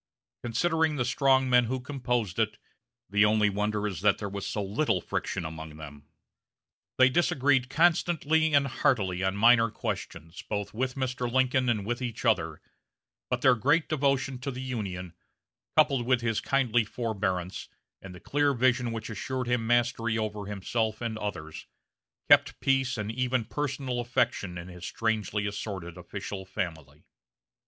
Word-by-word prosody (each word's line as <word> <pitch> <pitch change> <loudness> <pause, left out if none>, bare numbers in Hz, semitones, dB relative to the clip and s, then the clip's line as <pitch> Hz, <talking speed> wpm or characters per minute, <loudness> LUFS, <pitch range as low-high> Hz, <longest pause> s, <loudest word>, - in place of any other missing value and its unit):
Considering 160 +6 +1
the 125 -4 0
strong 130 +1 +3
men 125 -1 +5
who 130 +3 -2
composed 125 -7 -2
it, 110 -1 0 0.5
the 105 +1 +3
only 105 -1 +3
wonder 105 +1 -1
is 100 -3 -3
that 105 -1 +4
there 100 - -4
was 100 0 -5
so 105 - -2
little 100 +1 0
friction 90 +1 -3
among 80 -1 -7
them. 75 -1 -11 0.9
They 130 - +7
disagreed 135 -3 +2
constantly 160 0 +2
and 140 -1 +4
heartily 105 -9 0
on 95 +1 0
minor 115 +2 +5
questions, 80 -5 -5
both 105 -2 -4
with 125 +3 -2
Mr. 125 -2 -2
Lincoln 130 0 +2
and 105 -4 0
with 120 +3 -2
each 120 -1 -4
other, 80 -9 +1 0.7
but 125 -1 -1
their 130 -1 +6
great 145 +8 +2
devotion 135 -3 0
to 140 +2 -4
the 130 -1 -5
Union, 95 -9 -4 0.6
coupled 140 -6 +3
with 125 -2 +3
his 115 -2 0
kindly 120 -4 +2
forbearance, 100 -5 -3 0.3
and 95 -2 -10
the - - -11
clear 145 +4 +1
vision 125 -1 +2
which 115 -1 -5
assured 130 +4 -3
him 120 -2 0
mastery 120 -1 +1
over 105 -2 -3
himself 110 +2 -2
and 115 -2 -2
others, 80 -7 -6 0.6
kept - - +5
peace 135 -2 +1
and 105 0 -3
even 125 0 0
personal 135 -2 -3
affection 120 -6 -1
in 85 0 -7
his 90 -1 -11
strangely 105 +1 -1
assorted 100 -4 -5
official 95 +2 -6
family. 80 -7 -6
115 Hz, 155 wpm, -28 LUFS, 100-130 Hz, 0.9 s, They